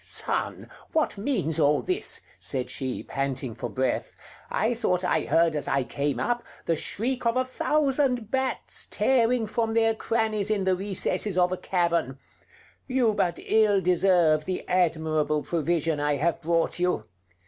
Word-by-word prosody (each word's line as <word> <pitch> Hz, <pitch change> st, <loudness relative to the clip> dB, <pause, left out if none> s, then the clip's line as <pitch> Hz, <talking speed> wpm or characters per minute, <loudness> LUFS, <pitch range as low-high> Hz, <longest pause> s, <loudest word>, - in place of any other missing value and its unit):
"Son! -, -, -1 dB, 0.3 s
what 315 Hz, -8 st, +1 dB
means 195 Hz, -, -1 dB
all 150 Hz, -1 st, +3 dB
this?" 365 Hz, 0 st, 0 dB, 0.2 s
said 130 Hz, -3 st, -2 dB
she, 130 Hz, -1 st, -2 dB
panting 135 Hz, -3 st, -3 dB
for 120 Hz, +2 st, -5 dB
breath. 130 Hz, +3 st, -2 dB, 0.3 s
"I 225 Hz, +2 st, 0 dB
thought 180 Hz, -6 st, 0 dB
I 180 Hz, -, +1 dB
heard 165 Hz, -1 st, +2 dB
as 150 Hz, -, -1 dB
I 135 Hz, -1 st, +1 dB
came 140 Hz, +3 st, -2 dB
up, 240 Hz, 0 st, 0 dB, 0.2 s
the 165 Hz, -, +1 dB
shriek 245 Hz, -, -2 dB
of 235 Hz, +1 st, +1 dB
a 255 Hz, -, +2 dB
thousand 265 Hz, -4 st, 0 dB
bats, 265 Hz, -1 st, 0 dB
tearing 245 Hz, -2 st, +2 dB
from 225 Hz, +1 st, -1 dB
their 225 Hz, 0 st, +3 dB
crannies 220 Hz, -2 st, -1 dB
in 210 Hz, -2 st, +1 dB
the 190 Hz, 0 st, +2 dB
recesses 195 Hz, 0 st, 0 dB
of 180 Hz, 0 st, +3 dB
a 185 Hz, -, -1 dB
cavern.... 170 Hz, -8 st, 0 dB, 0.7 s
You 255 Hz, -4 st, +2 dB
but 175 Hz, -4 st, 0 dB
ill 215 Hz, -2 st, +3 dB
deserve 175 Hz, -4 st, +3 dB
the 185 Hz, -, -4 dB
admirable 155 Hz, -4 st, +1 dB
provision 165 Hz, -2 st, 0 dB
I 145 Hz, 0 st, +1 dB
have 165 Hz, +4 st, -1 dB
brought 165 Hz, +1 st, 0 dB
you." 180 Hz, 0 st, 0 dB
180 Hz, 155 wpm, -26 LUFS, 155-225 Hz, 0.7 s, all